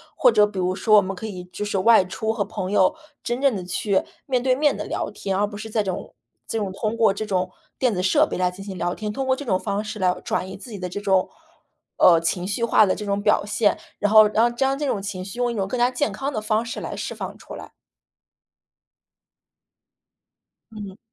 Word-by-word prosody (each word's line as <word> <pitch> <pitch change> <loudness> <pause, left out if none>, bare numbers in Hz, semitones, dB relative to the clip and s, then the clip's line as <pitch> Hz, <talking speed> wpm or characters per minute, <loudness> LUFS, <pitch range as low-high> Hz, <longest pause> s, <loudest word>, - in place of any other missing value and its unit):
或 - - +5
者 210 -2 +5
比 205 -2 -10
如 180 0 +1
说 215 +2 +4
我 - - +7
们 195 0 -4
可 205 - -7
以 185 -4 -6
就 180 +3 -6
是 205 -2 -1
外 220 -1 +5
出 220 +4 -2
和 215 -3 -1
朋 195 -2 -5
友 190 +6 +3 0.3
真 240 +1 -2
正 275 -5 +3
地 185 -2 -5
去 190 +2 0 0.2
面 255 -3 +1
对 255 +1 +2
面 295 +2 +2
地 - - -4
聊 - - -3
天 195 -1 -3
儿， 195 - +1
而 205 - +2
不 205 -1 -8
是 220 +1 -7
这 215 -1 0
种 185 -2 -5 0.3
这 225 - -2
种 195 -2 -2
通 215 +3 -2
过 225 -3 +4
这 215 +2 -4
种 185 -3 -1 0.3
电 250 -4 +2
子 180 - -1
设 185 - +4
备 - - -4
来 180 0 +2
进 190 +2 -10
行 195 -2 -7
聊 175 0 -1
天， 210 +1 -4
通 270 +5 -3
过 260 0 +2
这 285 - -7
种 190 -8 0
方 205 +2 -2
式 215 0 -6
来 180 -1 +2
转 185 - -2
移 - - -7
自 225 +4 -11
己 205 - -7
的 180 - -3
这 205 +3 -6
种， 190 -2 +2 0.7
呃， 165 -2 +6
情 175 +2 -1
绪 220 +3 -2
化 225 -2 +5
的 185 - +1
这 210 - -6
种 200 0 -1
表 210 0 +3
现， 210 0 +1 0.2
然 205 - +1
后 215 -1 +8
让 235 +3 +2
将 270 +2 +1
这 295 - -1
种 205 - -1
情 195 -2 -5
绪 200 +5 -8
用 245 -1 +1
一 - - -5
种 195 - -1
更 250 - -3
加 245 +1 +3
健 270 +3 0
康 275 +1 -3
的 225 - -2
方 215 +1 0
式 235 - -5
来 - - -5
释 - - -4
放 - - -7
出 - - -12
来。 - - -9 3.0
嗯。 205 -2 -8
205 Hz, 265 characters per minute, -23 LUFS, 190-230 Hz, 3.0 s, 后